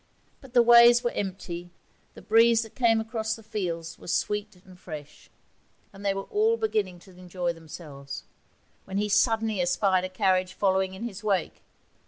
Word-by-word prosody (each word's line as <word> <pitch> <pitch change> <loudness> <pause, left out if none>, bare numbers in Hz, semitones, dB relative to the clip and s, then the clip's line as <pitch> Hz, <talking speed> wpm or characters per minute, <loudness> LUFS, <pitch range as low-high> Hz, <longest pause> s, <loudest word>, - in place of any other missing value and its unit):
But 265 -3 -15
the 240 - +7
ways 235 0 +7
were 240 - 0
empty, 180 -3 -5 0.5
the - - -12
breeze 230 +1 +4
that 225 - -12
came 230 -3 +3
across 220 -1 -2
the 225 - -14
fields 175 -7 -4
was - - 0
fresh 210 0 -3 0.2
and 185 -1 -15
sweet, 150 -4 -10 0.6
and 195 +1 -12
they 200 -1 +1
were 195 - -3
all 440 - +1
beginning 210 - -1
to 190 - -17
enjoy 180 -1 -4
themselves, 155 -4 -9 0.6
when 190 0 -5
he 210 +1 0
suddenly 220 -1 +2
espied 185 +1 +2
a 185 - -3
carriage 185 0 +1
following 190 -1 +1
in 195 - -8
his 210 -3 -6
wake. 195 -5 -1
195 Hz, 170 wpm, -27 LUFS, 180-225 Hz, 0.6 s, the